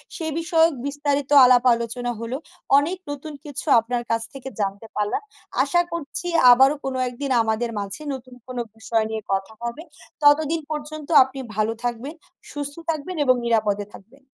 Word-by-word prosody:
সে 330 - -5
বিষয়ক 330 -1 +3
বিস্তারিত 285 -1 -1 0.2
আলাপ 250 0 +5
আলোচনা 235 +1 -3
হলো। 235 +3 -4 0.4
অনেক 335 +6 +1
নতুন 290 +2 -7
কিছু 290 +1 -5
আপনার 240 +1 -3
কাছ 230 0 +1
থেকে 270 0 -7
জানতে 200 +2 -3
পারলাম। 210 - -1 0.4
আশা 345 0 +2
করছি 340 +2 -4 0.2
আবারো 265 +4 +6
কোনো 260 -1 -2
একদিন 265 +2 -4
আমাদের 225 +1 -1
মাঝে 200 +8 -5
নতুন 255 -1 -9
কোনো 250 -1 -4
বিষয় 225 0 0
নিয়ে 220 -1 -3
কথা 195 +2 -1
হবে। 235 +7 -4 0.4
ততদিন 310 +2 +4
পর্যন্ত 300 0 -5 0.2
আপনি 265 +1 -9 0.2
ভালো 215 +1 +1
থাকবেন, 245 +5 -3 0.4
সুস্থ 285 -1 -4
থাকবেন 325 +3 -3
এবং 255 -1 +5
নিরাপদে 210 -3 +1
থাকবেন। 265 +7 -16
260 Hz, 155 wpm, -23 LUFS, 230-290 Hz, 0.4 s, আবারো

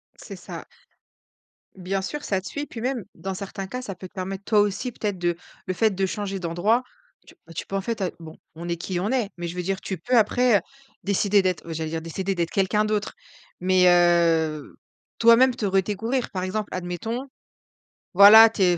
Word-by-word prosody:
C'est - - -10
ça. - - -9 1.1
Bien 190 +1 -3
sûr, 295 +10 -5
ça 195 -2 -1
te - - -9
suit, 290 0 -4
puis 225 - -9
même, 250 -4 -2
dans 195 0 -5
certains 195 0 -6
cas, 250 +5 -5
ça 195 - -5
peut 185 +2 -9
te - - -33
permettre, 195 0 -5
toi 215 -2 +3
aussi 205 +5 -1
peut-être, 205 -4 -3
de 175 -1 0 0.3
le 185 - -1
fait 220 +4 +3
de 195 0 -1
changer 195 -1 -4
d'endroit, 185 +8 +1 0.4
tu, - - -16
bah, 165 - -13
tu - - -5
peux, 195 - -5
en 195 - 0
fait 225 0 -4 0.2
bon 160 -1 -10 0.2
on 170 +2 -7
est 170 - -1
qui 175 +1 -3
on 205 +6 -1
est. 240 -6 0
Mais 175 - -4
je 170 - -6
veux 180 - -2
dire, 195 +1 -2
tu 190 - -4
peux 250 +4 +1
après, 230 +1 +4
heu, - - -3 0.4
décider 200 0 +2
d'être 185 -3 -1
heu, 165 - -4
j'allais 160 0 -3
dire, 160 0 -3
décider 190 +4 -3
d'être 170 -1 -1
quelqu'un 200 +2 +1
d'autre, 210 -1 -2 0.5
mais, 185 0 +3
heu, 165 -3 +2 0.4
toi-même, 235 +2 +6
te 210 - -3
redécouvrir. 210 +6 0
Par 185 -2 -3
exemple, 205 +3 -3
admettons, 185 +9 -4 0.9
voilà, 210 +4 +10
tu 220 - -5
es 175 -2 +4
195 Hz, 210 wpm, -24 LUFS, 175-215 Hz, 1.1 s, voilà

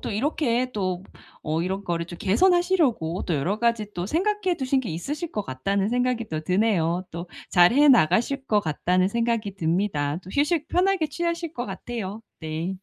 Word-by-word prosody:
또 - - -4
이렇게 250 +1 0
또 185 -4 -2 0.5
어 155 +1 +1
'이런 190 +2 -3
거를 170 -1 -2
좀 175 - -8
개선하시려고 285 - +2
또 170 - 0
여러 175 +9 -1
가지 230 -3 0
또 175 +1 -3
생각해 375 - 0
두신 265 -1 +1
게 245 - -6
있으실 290 - -4
것 210 - -2
같다.'는 195 +10 -1
생각이 245 -1 0
또 155 -1 -2
드네요. 180 -1 +1
또 170 +2 -6 0.2
'잘해 230 +12 +6
나가실 245 - +3
것 210 - +3
같다.'는 180 +2 +1
생각이 230 -2 -1
듭니다. 165 -4 0
또 185 - -10
휴식 300 +2 +1
편하게 365 -2 +2
취하실 335 +1 -2
것 245 -5 -4
같아요. 220 -3 -5 0.2
네. 160 +3 -3
210 Hz, 340 characters per minute, -25 LUFS, 175-275 Hz, 0.5 s, 잘해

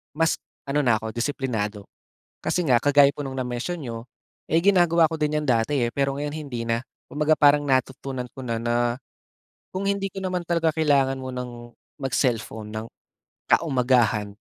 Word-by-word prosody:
mas 165 +1 +1 0.3
ano 140 +2 +1
na 120 -4 +4
ako 110 0 -5
disiplinado. 115 -5 -2 0.6
Kasi 180 -3 0
nga, 125 - +5
kagaya 145 -1 +6
po 145 - -5
nung 135 -1 -4
na-mention 125 +8 -3
niyo, 115 -5 -6 0.5
eh, 165 - +5
ginagawa 170 -3 +4
ko 160 - -4
din 150 -1 0
'yon 150 - -5
dati 125 +3 +2
eh, - - -5
pero 140 -1 +1
ngayon 145 +1 -3
hindi 130 -7 -5
na. 115 +1 0 0.2
Kumbaga 150 +1 +2
parang 145 0 +5
natutunan 130 -1 -1
ko 130 - -7
na 115 -2 -2
na, 120 +1 0 1.0
kung 190 +1 -3
hindi 200 0 0
ko 195 - -5
naman 180 -1 -2
talaga 165 -2 +1
kailangan 140 -4 +3
munang 125 -2 -7 0.3
mag-cellphone 120 -5 -1
ng 110 +1 -4 0.6
kaumagahan, 125 -8 +2
135 Hz, 160 wpm, -24 LUFS, 120-155 Hz, 1.0 s, kagaya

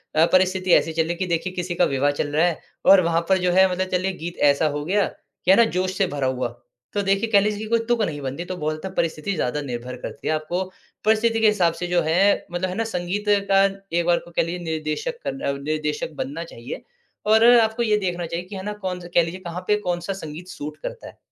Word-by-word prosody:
अ, 160 +1 +6
परिस्थिति 185 0 +3
ऐसी 160 - +4
चल 160 - +2
रही 160 - -6
है - - -2
कि 185 - -1
देखिए 175 +2 -1
किसी 180 -1 -3
का 175 - +4
विवाह 140 0 +1
चल 145 - -2
रहा 160 +3 +4
है 175 -3 0 0.3
और 195 -1 +8
वहाँ 165 0 +2
पर 190 - +5
जो 180 -1 +1
है 190 +1 +5
मतलब 185 +1 -1
चलिए 185 +1 +1
गीत 175 +1 -5
ऐसा 140 +3 +1
हो 145 - -4
गया 200 +4 +2
कि 180 - -3
है 195 - +7
ना, 235 - +7
जोश 185 -2 -2
से 195 - +2
भरा 140 -4 -2
हुआ, 130 -1 -1 0.5
तो 205 - +1
देखिए 195 +3 +1
कह 205 - +7
लीजिए 210 +1 0
कि 220 - -4
कोई 230 0 +3
तुक 240 -1 +2
नहीं 150 -7 -3
बनती। 140 +5 -4
तो 185 - -5
बहुत 155 +1 -3
परिस्थिति 165 +3 -1
ज़्यादा 150 0 -1
निर्भर 125 -2 -5
करती - - -7
है - - +2
आपको 155 +4 -2 0.4
परिस्थिति 225 +1 +3
के 220 - +5
हिसाब 185 -6 +3
से 175 - -1
जो 175 0 +2
है, 175 +6 +2
मतलब 175 +2 -2
है 180 - -4
ना? 225 - 0
संगीत 180 +4 -2 0.3
का 195 0 +6 0.3
एक 170 - +1
बार 175 0 +3
को 175 - -14
कह - - +1
लीजिए 170 +2 -4
निर्देशक 160 - -3
कर 270 0 -4
अ, - - 0
निर्देशक 150 +2 -2
बनना 145 +6 -6
चाहिए। 125 -6 -8 0.4
और 220 +2 +5
आपको 220 +1 +1
ये 215 -2 +3
देखना 180 -3 -2
चाहिए 170 +2 -4
कि 200 +2 -9
है 190 - -6
ना, 210 +1 -3
कौन-सा 185 -4 -5
कह 170 - +5
लीजिए 170 +3 -5
कहाँ 170 +2 -5
पे 210 - +4
कौन-सा 175 +2 -1
संगीत 160 +3 -8
सूट 150 -4 -7
करता - - -6
है। - - -13
180 Hz, 250 wpm, -23 LUFS, 160-195 Hz, 0.5 s, और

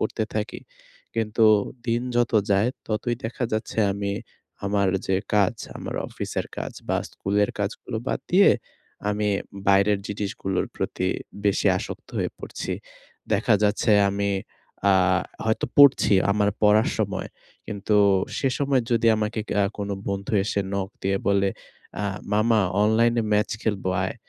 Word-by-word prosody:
করতে - - -1
থাকি। - - -3 0.5
কিন্তু 110 0 +1 0.4
দিন 120 0 +1
যত 120 0 +2 0.2
যায় 100 +4 +3 0.2
ততই 115 +2 -1
দেখা 120 +2 -2
যাচ্ছে 110 +1 -3
আমি 100 0 -2 0.5
আমার 100 -1 +1 0.2
যে 95 - +2 0.2
কাজ 100 +1 +3 0.2
আমার - - -6
অফিসের - - -4
কাজ - - -4 0.2
বা - - +2 0.2
স্কুলের 100 +1 0
কাজগুলো 105 +3 -3
বাদ - - -1
দিয়ে, 195 +3 +7 0.6
আমি 105 0 0 0.4
বাইরের 100 +1 +4
জিনিসগুলোর 95 -2 -2
প্রতি 95 - -2 0.4
বেশি 100 -1 +2
আসক্ত - - -7
হয়ে - - -1
পড়ছি। - - -5 0.6
দেখা 110 +2 +3
যাচ্ছে 105 +2 +2 0.2
আমি 100 0 -1 0.6
আ - - +6 0.5
হয়তো 110 0 0
পড়ছি 140 -7 +7 0.2
আমার 105 0 +2
পড়ার 105 +1 +5
সময়। - - -2 0.4
কিন্তু 105 0 0 0.4
সে 135 - +1
সময় 140 -3 +2
যদি 115 0 +2
আমাকে 110 +1 -2
ক্যা 100 - +2
কোন 100 0 -3 0.2
বন্ধু 100 +1 -3
এসে 100 - 0
নক 100 -1 -1
দিয়ে 95 0 +1
বলে, 100 0 +3 0.5
"আ - - -1 0.3
মামা 110 +1 +3 0.2
অনলাইনে 115 +2 +3
ম্যাচ 105 0 +2
খেলব 105 -4 -1 0.2
আয়।" 95 - -3
105 Hz, 140 wpm, -24 LUFS, 100-115 Hz, 0.6 s, দিয়ে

